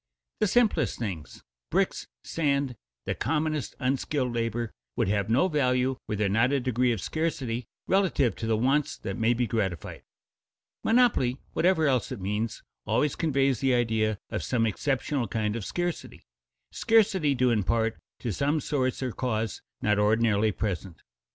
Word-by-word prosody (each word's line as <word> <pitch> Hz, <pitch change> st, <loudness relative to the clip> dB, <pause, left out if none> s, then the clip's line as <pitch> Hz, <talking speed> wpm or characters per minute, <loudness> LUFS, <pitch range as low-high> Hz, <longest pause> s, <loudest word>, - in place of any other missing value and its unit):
The 215 Hz, -, +3 dB
simplest 235 Hz, +2 st, +2 dB
things 95 Hz, -10 st, -6 dB, 0.3 s
bricks, -, -, 0 dB, 0.2 s
sand, 140 Hz, -5 st, 0 dB, 0.3 s
the -, -, -1 dB
commonest 150 Hz, 0 st, -1 dB
unskilled 130 Hz, -1 st, -1 dB
labor 115 Hz, -1 st, -2 dB, 0.2 s
would -, -, +1 dB
have 100 Hz, 0 st, 0 dB
no 130 Hz, +11 st, +4 dB
value 130 Hz, -5 st, +1 dB
were 105 Hz, -, -2 dB
there 105 Hz, 0 st, +1 dB
not 115 Hz, +6 st, +3 dB
a 140 Hz, -, +2 dB
degree 125 Hz, -1 st, +1 dB
of 115 Hz, -, -1 dB
scarcity 130 Hz, -, -2 dB, 0.2 s
relative 170 Hz, -, +2 dB
to 110 Hz, -, -4 dB
the 110 Hz, -1 st, +2 dB
wants 135 Hz, +5 st, +1 dB
that 95 Hz, -, -5 dB
may 115 Hz, +2 st, +3 dB
be 120 Hz, +1 st, +1 dB
gratified. 100 Hz, -, -3 dB, 0.8 s
"Monopoly," 225 Hz, -, +3 dB, 0.2 s
whatever 175 Hz, -3 st, +3 dB
else 130 Hz, -5 st, +1 dB
it -, -, -4 dB
means, 105 Hz, +4 st, -3 dB, 0.2 s
always 150 Hz, -, +1 dB
conveys 135 Hz, -6 st, +1 dB
the 130 Hz, -2 st, +2 dB
idea 110 Hz, -3 st, +1 dB
of -, -, -2 dB
some 115 Hz, -3 st, +1 dB
exceptional 130 Hz, +3 st, -1 dB
kind 105 Hz, +1 st, -1 dB
of 115 Hz, -, -4 dB
scarcity, 175 Hz, -, -4 dB, 0.5 s
scarcity 200 Hz, -10 st, +3 dB
due 125 Hz, -1 st, +3 dB
in 110 Hz, -3 st, +2 dB
part 115 Hz, +3 st, 0 dB, 0.2 s
to 115 Hz, -4 st, -2 dB
some 145 Hz, +8 st, +1 dB
source 130 Hz, -3 st, -1 dB
or 130 Hz, -, -1 dB
cause 115 Hz, -3 st, -2 dB, 0.2 s
not 105 Hz, 0 st, +2 dB
ordinarily 110 Hz, 0 st, +3 dB
present. 95 Hz, -4 st, -4 dB
125 Hz, 155 wpm, -27 LUFS, 110-145 Hz, 0.8 s, no